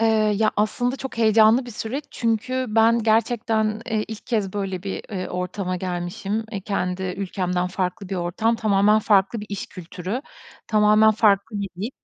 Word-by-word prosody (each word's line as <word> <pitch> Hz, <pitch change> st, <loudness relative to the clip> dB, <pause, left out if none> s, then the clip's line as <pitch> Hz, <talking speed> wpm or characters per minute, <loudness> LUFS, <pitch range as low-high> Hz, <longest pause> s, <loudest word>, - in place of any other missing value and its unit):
Eee, 220 Hz, -2 st, +3 dB
ya, 215 Hz, +1 st, +3 dB
aslında 245 Hz, +5 st, 0 dB
çok 265 Hz, -3 st, -7 dB
heyecanlı 220 Hz, +2 st, +5 dB
bir -, -, -7 dB
süreç. 240 Hz, +6 st, -4 dB
Çünkü 250 Hz, +3 st, -1 dB
ben 225 Hz, +2 st, +4 dB
gerçekten, 220 Hz, -1 st, +1 dB
eee, 220 Hz, -3 st, -1 dB
ilk 220 Hz, -1 st, -8 dB
kez 210 Hz, -6 st, -1 dB
böyle 195 Hz, -3 st, -3 dB
bir, 195 Hz, -1 st, -4 dB
eee, 185 Hz, -3 st, -4 dB
ortama 180 Hz, +1 st, -3 dB
gelmişim. 180 Hz, +4 st, -3 dB
E, 200 Hz, -, -3 dB
kendi 190 Hz, -2 st, -2 dB
ülkemden 180 Hz, -2 st, -1 dB
farklı 185 Hz, +2 st, -3 dB
bir 195 Hz, -, -3 dB
ortam, 185 Hz, +7 st, 0 dB
tamamen 210 Hz, -1 st, +3 dB
farklı 205 Hz, +1 st, +2 dB
bir 210 Hz, -, -8 dB
iş 200 Hz, -1 st, -5 dB
kültürü, 185 Hz, +6 st, -6 dB, 0.5 s
tamamen 215 Hz, 0 st, +5 dB
farklı 210 Hz, 0 st, +2 dB
bir 200 Hz, -, -3 dB
dil. 225 Hz, -, -2 dB
215 Hz, 165 wpm, -23 LUFS, 190-225 Hz, 0.5 s, heyecanlı